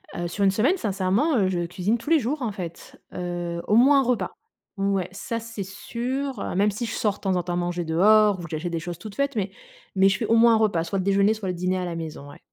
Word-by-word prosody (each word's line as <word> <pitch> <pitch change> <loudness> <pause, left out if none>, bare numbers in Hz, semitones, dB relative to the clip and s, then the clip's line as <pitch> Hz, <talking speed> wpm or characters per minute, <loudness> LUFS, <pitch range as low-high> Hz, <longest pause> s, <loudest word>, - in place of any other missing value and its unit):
Heu, 175 - -2
sur 200 +4 -2
1 195 - +5
semaine, 255 - +2
sincèrement, 205 - +1
heu, 195 -4 +3
je 175 -2 -1
cuisine 185 +6 -1
tous 230 +5 -8
les 330 -1 +5
jours, 275 +4 -2
en 235 -4 -1
fait, 175 -5 -8
heu, 175 -1 -4
au 210 - +3
moins 275 +4 +6
1 - - +3
repas. 250 -1 0 0.5
Ouais, 195 -2 0
ça 230 +4 -4
c'est 225 -3 -6
sûr, 245 +6 -4
heu. - - -4
Même 205 +2 +3
si 235 +4 -4
je 225 - -4
sors 210 -2 0
de - - -18
temps 190 -2 0
en 180 - 0
temps 175 0 -2
manger 175 0 -2
dehors 205 +5 +4
ou - - -7
que 170 - -8
j'achète 165 +2 -3
des 165 - -2
choses 175 +1 -6
toutes 215 -2 -9
faites, 280 -2 -1
mais 200 -2 -1 0.4
mais 190 0 +5
je 190 -1 +2
fais 225 - -2
au 230 - +3
moins 230 0 +6
1 - - +4
repas 205 -7 +1
soit 185 +3 -2
le - - -1
déjeuner, 200 +2 +3
soit 215 -4 -5
le 180 - -2
dîner 180 +2 -1
à 180 - -2
la 170 -1 -4
maison, 155 -3 -7
ouais. 145 - -13
195 Hz, 280 wpm, -24 LUFS, 175-225 Hz, 0.5 s, moins